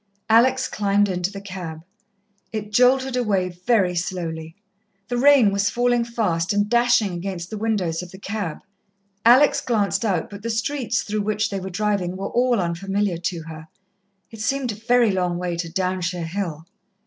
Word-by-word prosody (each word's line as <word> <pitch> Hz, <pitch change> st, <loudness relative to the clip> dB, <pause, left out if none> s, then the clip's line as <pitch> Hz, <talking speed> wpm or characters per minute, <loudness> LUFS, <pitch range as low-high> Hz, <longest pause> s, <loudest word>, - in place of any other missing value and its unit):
Alex 260 Hz, +3 st, +4 dB
climbed 205 Hz, 0 st, +1 dB
into 180 Hz, -1 st, -1 dB
the 200 Hz, -, -7 dB
cab. 180 Hz, -5 st, -7 dB, 0.7 s
It 215 Hz, -1 st, -5 dB
jolted 255 Hz, +3 st, +3 dB
away 200 Hz, -7 st, +1 dB
very 180 Hz, +1 st, +1 dB
slowly. 165 Hz, -2 st, -4 dB, 0.5 s
The 245 Hz, -, -1 dB
rain 270 Hz, -6 st, +6 dB
was 200 Hz, 0 st, +1 dB
falling 245 Hz, 0 st, +1 dB
fast, 205 Hz, -7 st, -1 dB
and 205 Hz, 0 st, +1 dB
dashing 235 Hz, -3 st, +3 dB
against 175 Hz, 0 st, -5 dB
the 215 Hz, -, -4 dB
windows 195 Hz, -7 st, -1 dB
of 180 Hz, -, -9 dB
the 190 Hz, -, -12 dB
cab. 200 Hz, -4 st, -4 dB, 0.6 s
Alex 255 Hz, +5 st, +6 dB
glanced 220 Hz, -2 st, 0 dB
out, 190 Hz, -7 st, 0 dB
but 200 Hz, 0 st, -9 dB
the 230 Hz, -, -4 dB
streets 235 Hz, +1 st, -1 dB
through 210 Hz, 0 st, -2 dB
which 215 Hz, +1 st, -1 dB
they 195 Hz, -, -2 dB
were 190 Hz, +1 st, -6 dB
driving 190 Hz, -2 st, -1 dB
were 195 Hz, -, -4 dB
all 245 Hz, -2 st, +2 dB
unfamiliar 190 Hz, +2 st, -1 dB
to 170 Hz, -1 st, -3 dB
her. 160 Hz, 0 st, -10 dB, 0.6 s
It 225 Hz, -2 st, -9 dB
seemed 265 Hz, +1 st, -1 dB
a -, -, -6 dB
very 235 Hz, +1 st, +3 dB
long 180 Hz, -2 st, 0 dB
way 175 Hz, -1 st, -2 dB
to 170 Hz, -1 st, -3 dB
Downshire 180 Hz, -1 st, -2 dB
Hill. 165 Hz, -3 st, -4 dB
200 Hz, 170 wpm, -22 LUFS, 180-230 Hz, 0.7 s, rain